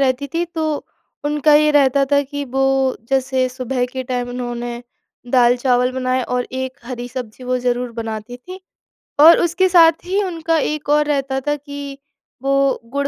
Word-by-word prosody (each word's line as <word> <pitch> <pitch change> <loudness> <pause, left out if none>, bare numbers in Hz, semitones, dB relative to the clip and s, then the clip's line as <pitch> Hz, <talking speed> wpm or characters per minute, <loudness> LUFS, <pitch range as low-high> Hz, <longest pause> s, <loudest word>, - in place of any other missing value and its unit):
रहती 265 +1 +1
थी 340 - +1
तो 315 -3 -3 0.4
उनका 295 +1 +2
ये 300 0 +5
रहता 280 -2 +3
था 285 - +5
कि 285 +1 -5
वो 270 0 +1
जैसे 265 -1 +1
सुबह 255 0 -2
के 260 +1 -5
टाइम 245 -1 -3
उन्होंने 240 -1 -5 0.5
दाल 245 -1 +4
चावल 250 0 +1
बनाए 255 0 -1
और 250 0 -2
एक 260 0 -4
हरी 245 -1 -6
सब्जी 250 -1 -8
वो 255 0 0
ज़रूर 245 0 -1
बनाती 225 +1 -6
थीं 365 +9 -11 0.7
और 335 +2 +9
उसके 345 +2 +2
साथ 330 -2 +5
ही 390 +3 0
उनका 330 -3 -1
एक 300 -1 -2
और 300 0 +3
रहता 275 -2 -1
था 295 - +2
कि 285 -1 -8 0.4
वो 275 0 +1
गुड़ 280 +1 -1
265 Hz, 170 wpm, -19 LUFS, 250-295 Hz, 0.7 s, और